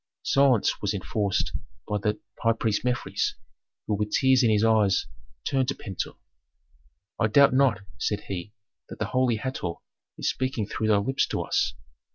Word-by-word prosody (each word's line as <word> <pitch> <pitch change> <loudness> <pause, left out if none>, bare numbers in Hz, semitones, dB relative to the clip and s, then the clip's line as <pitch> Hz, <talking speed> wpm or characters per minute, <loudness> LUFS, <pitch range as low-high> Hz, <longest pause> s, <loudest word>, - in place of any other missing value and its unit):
Silence 135 -5 +3
was - - 0
enforced 100 -3 -1 0.4
by 105 - -1
the 105 +1 -1 0.2
high 115 0 +4
priest 110 -2 -1
Mefres, 125 -1 -1 0.5
who 110 - -1
with 105 +1 -1
tears 130 +1 +4
in 120 - +4
his 105 0 +3
eyes 110 -4 +3 0.4
turned 130 -2 +1
to 140 - -1
Pentuer. 95 -4 -5 1.0
"I 110 - +3
doubt 140 +5 +5
not," 130 -7 +3 0.2
said 105 - -1
he, 95 +1 -6 0.4
"that - - -8
the - - -1
holy 130 -2 +1
Hator 110 -8 -3 0.4
is - - -2
speaking 130 -5 -1
through 110 +2 -2
thy 105 -1 +4
lips 130 +7 +1
to - - -2
us. - - 0
110 Hz, 165 wpm, -26 LUFS, 105-130 Hz, 1.0 s, doubt